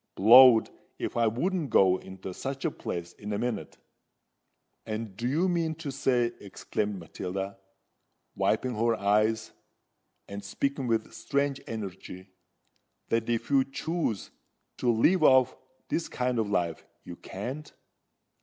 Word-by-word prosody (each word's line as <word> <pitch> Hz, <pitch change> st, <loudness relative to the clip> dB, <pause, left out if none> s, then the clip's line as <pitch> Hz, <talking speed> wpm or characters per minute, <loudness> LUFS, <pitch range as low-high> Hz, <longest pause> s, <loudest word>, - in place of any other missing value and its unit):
Blowed 120 Hz, +3 st, +8 dB, 0.3 s
if -, -, -4 dB
I 115 Hz, -1 st, +3 dB
wouldn't 160 Hz, -, -1 dB
go 95 Hz, -4 st, +5 dB
into 95 Hz, 0 st, -9 dB
such 135 Hz, -, -5 dB
a 160 Hz, -, +1 dB
place 85 Hz, -8 st, -6 dB
in 105 Hz, +1 st, -7 dB
a -, -, -1 dB
minute!" 120 Hz, -3 st, -3 dB, 1.1 s
"And 110 Hz, -2 st, -5 dB
do 115 Hz, +4 st, -3 dB
you 160 Hz, +8 st, +1 dB
mean 165 Hz, -3 st, 0 dB
to 155 Hz, -3 st, -6 dB
say," 125 Hz, -3 st, +1 dB
exclaimed 105 Hz, +1 st, -3 dB
Matilda, 95 Hz, +3 st, -5 dB, 0.8 s
wiping 130 Hz, -1 st, 0 dB
her 115 Hz, +1 st, +1 dB
eyes, 105 Hz, +2 st, +1 dB, 0.8 s
and 100 Hz, 0 st, -7 dB
speaking 135 Hz, +6 st, -2 dB
with 115 Hz, -1 st, -1 dB
strange 140 Hz, +5 st, -1 dB
energy, 95 Hz, -3 st, -7 dB, 0.8 s
"that 115 Hz, 0 st, 0 dB
if 115 Hz, +3 st, -1 dB
you 135 Hz, -1 st, +5 dB
choose 135 Hz, -, -3 dB, 0.5 s
to 125 Hz, -, 0 dB
leave 155 Hz, +11 st, +3 dB
off 130 Hz, -4 st, +5 dB, 0.3 s
this 170 Hz, -, -1 dB
kind 125 Hz, -1 st, -1 dB
of 110 Hz, -2 st, -1 dB
life, 85 Hz, -5 st, -1 dB, 0.2 s
you -, -, -8 dB
can't? 145 Hz, +4 st, -7 dB
115 Hz, 135 wpm, -28 LUFS, 100-135 Hz, 1.1 s, Blowed